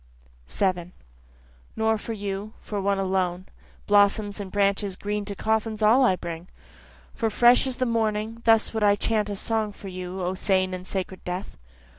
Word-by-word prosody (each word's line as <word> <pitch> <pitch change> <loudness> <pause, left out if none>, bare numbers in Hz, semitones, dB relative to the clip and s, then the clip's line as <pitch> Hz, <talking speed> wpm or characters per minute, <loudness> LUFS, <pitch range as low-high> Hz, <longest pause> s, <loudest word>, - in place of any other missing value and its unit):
7 180 - -1 0.8
(Nor 220 0 +1
for 225 - -5
you, 205 0 -5
for 205 -2 -4
one 200 0 +1
alone, 185 -1 -1 0.4
Blossoms 205 0 +3
and 195 -2 -6
branches 200 -1 +1
green 205 +1 -3
to 200 0 -4
coffins 220 +1 -1
all 235 +5 +6
I 215 -7 +4
bring, 170 -1 -7 0.7
For 225 - -1
fresh 240 +4 +5
as 260 - -3
the 255 - +1
morning, 225 -1 -1
thus 225 -1 +4
would 220 -1 -1
I 205 -1 +5
chant 210 0 0
a 205 - -3
song 220 +1 -1
for 200 -1 -10
you 185 0 -6
O 180 +1 -1
sane 185 -1 +1
and 185 0 -6
sacred 190 -1 -4
death. 180 +2 -5
205 Hz, 170 wpm, -25 LUFS, 190-220 Hz, 0.8 s, all